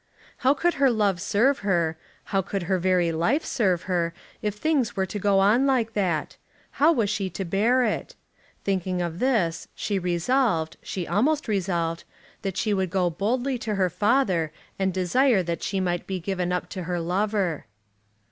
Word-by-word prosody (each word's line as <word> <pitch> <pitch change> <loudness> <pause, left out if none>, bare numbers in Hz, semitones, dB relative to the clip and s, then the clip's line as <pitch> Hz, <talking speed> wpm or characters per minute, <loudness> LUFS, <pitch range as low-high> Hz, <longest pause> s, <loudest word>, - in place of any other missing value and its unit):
How 265 +3 +3
could 345 +4 +1
her 275 - +6
love 205 -6 +1
serve 245 +8 +2
her, 170 -5 +1 0.4
how 195 - +3
could 195 0 -3
her 185 +1 0
very 180 -2 +2
life 175 - +1
serve 185 -7 +1
her, 170 -3 -1 0.3
if 210 -1 -2
things 270 0 0
were 190 - +1
to 205 +2 -5
go 200 0 +2
on 215 +8 +4
like 240 -4 +1
that? 180 -7 -1 0.4
How 310 +3 +7
was 235 -10 +1
she 200 -3 -1
to 190 +2 -5
bear 225 +8 +2
it? 245 - -2 0.5
Thinking 185 -2 -1
of 170 -1 -3
this 210 -11 +1
she 200 -2 -1
resolved 175 -1 0
she 180 -3 -4
almost 295 +8 +1
resolved 175 -5 -1 0.4
that 195 -2 -3
she 210 +1 +1
would 190 -2 0
go 180 -1 +1
boldly 245 - -1
to 215 -3 -2
her 185 -2 +1
father 190 - +2 0.3
and 190 -1 +1
desire 190 +4 +2
that 170 -1 -3
she 195 - -1
might 175 -2 -1
be 190 -1 -2
given 180 0 -2
up 180 - -1
to 185 - -5
her 175 0 -2
lover. 185 - -1
195 Hz, 175 wpm, -25 LUFS, 175-225 Hz, 0.5 s, How